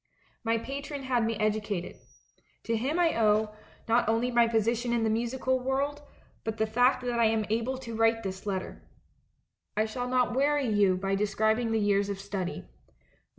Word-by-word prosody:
"My 230 0 +1
patron 280 +3 -5
had 250 -3 +1
me 225 0 0
educated. 210 -4 -1 0.7
To 230 - -1
him 265 +9 -1
I 345 -2 +3
owe, 215 0 +3 0.3
not 230 0 +3
only 230 +3 +1
my 235 -1 +4
position 230 +2 0
in 235 -1 +1
the 220 - +2
musical 255 +3 0
world, 275 +3 -1 0.4
but 220 0 -3
the 220 - +2
fact 245 +4 +2
that 240 -1 -1
I 230 - +5
am 220 -1 +2
able 235 +4 0
to 235 -3 -7
write 225 0 +2
this 190 +1 -6
letter. 190 -2 -4 1.0
I 215 - +3
shall 245 +3 -4
not 250 -1 +1
weary 285 +1 +2
you 205 -4 +3
by 195 +1 -2
describing 220 +3 +1
the 225 - +2
years 205 -1 +2
of 200 -1 -4
study. 195 - -4
225 Hz, 175 wpm, -29 LUFS, 215-250 Hz, 1.0 s, I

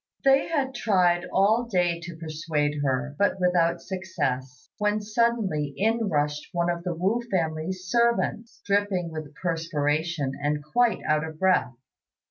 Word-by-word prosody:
They 270 0 +5
had 280 -5 -1
tried 180 -7 +2
all 215 +5 +3
day 180 -6 +1
to 170 0 -8
persuade 155 -2 -2
her, 140 +1 -1
but 200 -1 +2
without 180 -2 +2
success, 135 -9 -4
when 210 0 +1
suddenly 210 - 0
in 225 +1 +1
rushed 150 -1 -1
one 175 0 +1
of 170 0 -4
the 175 -2 -2
Wu 195 +8 +1
family's 170 0 -2
servants, 235 0 0
dripping 200 -4 0
with 155 -2 -7
perspiration 160 -2 -1
and 150 0 -1
quite 235 +10 +2
out 155 0 +2
of 160 -1 -7
breath. 185 -8 +2
175 Hz, 140 wpm, -26 LUFS, 150-205 Hz, -, They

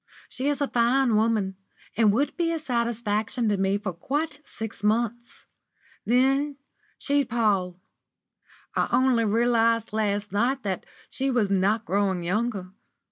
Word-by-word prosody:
"She 265 - -3
is 290 0 -1
a 285 - +2
fine 245 0 +2
woman, 210 -3 +1 0.4
and 220 -2 +4
would 270 +8 0
be 335 -1 0
a 330 - -1
satisfaction 235 -4 -1
to 205 - +1
me 195 +1 +1
for 200 -3 -4
quite 290 - -3
six 225 -6 -8
months. 235 +2 -1 0.6
Then 270 +4 +2 0.4
she'd 285 -2 0
pall. 195 -6 0 1.0
I - - +1
only 255 -3 +3
realised 230 0 +2
last 205 -2 -1
night 240 +6 0
that 190 -3 -3 0.2
she 270 +1 -1
was 230 -6 +1
not 200 +4 +1
growing 190 -2 0
younger. 195 0 -2
230 Hz, 135 wpm, -25 LUFS, 205-255 Hz, 1.0 s, and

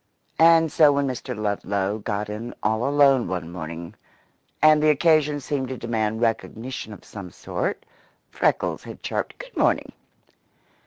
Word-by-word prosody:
And 165 -1 +6
so 155 -3 +6
when 140 0 +1
Mr. 125 -2 -4
Ludlow 100 -1 -1
got 105 0 -3
in 110 +3 -6
all 110 +4 +1
alone 140 -3 +4
one 90 -2 -4
morning, 85 -1 -7 0.7
and 155 0 +6
the 155 - +4
occasion 150 -1 +3
seemed 135 -1 -3
to 130 0 -5
demand 110 -1 -2
recognition 115 +1 -2
of 105 - -12
some 100 -4 -9
sort, - - -4 0.5
Freckles - - 0
had - - -10
chirped: - - -3
"Good - - -11
morning!" - - +1
120 Hz, 145 wpm, -24 LUFS, 105-145 Hz, 0.7 s, And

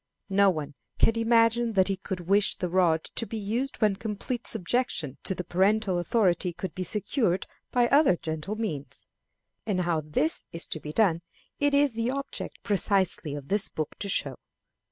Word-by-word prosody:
No 200 0 +5
one 155 -5 -3 0.2
can 225 - +4
imagine 230 0 +3
that 190 -2 +4
he 195 - 0
could 185 -1 -5
wish 200 +4 +2
the 180 - -3
rod 170 -3 +3
to 230 - -1
be 225 - -5
used 230 +6 -2
when 210 -2 +3
complete 230 +3 -4
subjection 180 - -1
to 190 - -2
the 180 - -4
parental 190 +2 +2
authority 180 -3 +1
could 180 +2 -6
be 185 - -5
secured 195 - 0 0.3
by 245 -1 +3
more 275 - +5
gentle 160 +6 -4
means. 175 -11 -4 0.6
And 190 -4 +1
how 170 -3 0
this 155 +1 +1
is 165 - 0
to 155 - -1
be 150 - -7
done 170 -3 +2 0.4
it 285 0 +2
is 285 -3 +3
the 230 +2 -1
object 275 +1 -5
precisely 190 -6 +1
of 140 -1 -8
this 200 0 +1
book 155 -2 -4
to 200 - -3
show. 140 -8 -1
195 Hz, 175 wpm, -27 LUFS, 170-225 Hz, 0.6 s, No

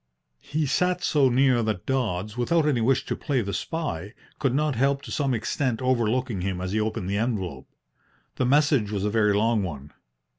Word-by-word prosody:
He 155 +1 -2
sat 180 +5 +1
so 140 -3 +3
near 130 -1 +3
that 110 -5 -2
Dodds, 105 -6 -1
without 150 +7 +1
any 130 -6 +2
wish 130 +3 +2
to - - -2
play 140 -5 -1
the 100 -2 -4
spy, 105 - -4 0.2
could 135 -2 +1
not 150 0 +1
help 140 +3 +1
to - - -9
some 140 -3 0
extent 115 +2 -1
overlooking 125 -3 0
him 95 -1 -2
as 95 0 -3
he 110 - 0
opened 110 -3 -2
the 100 +1 -1
envelope. 95 - -3 0.7
The 130 - +1
message 140 -5 +3
was 100 -2 -2
a 105 - 0
very 105 -2 +3
long 110 +1 +2
one. 75 -6 -6
120 Hz, 190 wpm, -25 LUFS, 105-135 Hz, 0.7 s, so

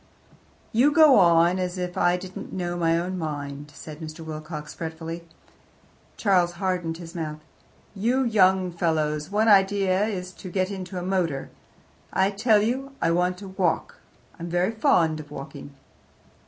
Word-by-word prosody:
"You 255 +6 +4
go 300 -6 +7
on 170 0 +5
as 180 0 -2
if 180 0 -4
I 175 0 +3
didn't 185 +1 -8
know 175 -2 -3
my 165 -1 +2
own 180 +2 -3
mind," 145 -2 -5
said 155 -1 -9
Mr. 160 0 -8
Wilcox 155 -1 -7
fretfully. 165 +1 -6 0.9
Charles 180 -4 +2
hardened 175 -2 -2
his 170 -1 -10
mouth. 155 -3 -4 0.5
"You 235 +6 +1
young 190 -5 +3
fellows' 155 -2 -1
one 210 +2 +1
idea 195 -1 +4
is 185 -4 -4
to 185 - -7
get 185 +2 -1
into 190 -1 -6
a 180 - -3
motor. 175 -7 -1 0.6
I 190 +1 +2
tell 210 +1 +3
you, 265 +4 -2
I 165 - +2
want 180 +1 +1
to - - -8
walk: 190 -3 -1 0.4
I'm 170 +1 -5
very 175 +4 +1
fond 175 - +2
of 150 -1 -10
walking." 140 0 -9
180 Hz, 155 wpm, -25 LUFS, 165-195 Hz, 0.9 s, go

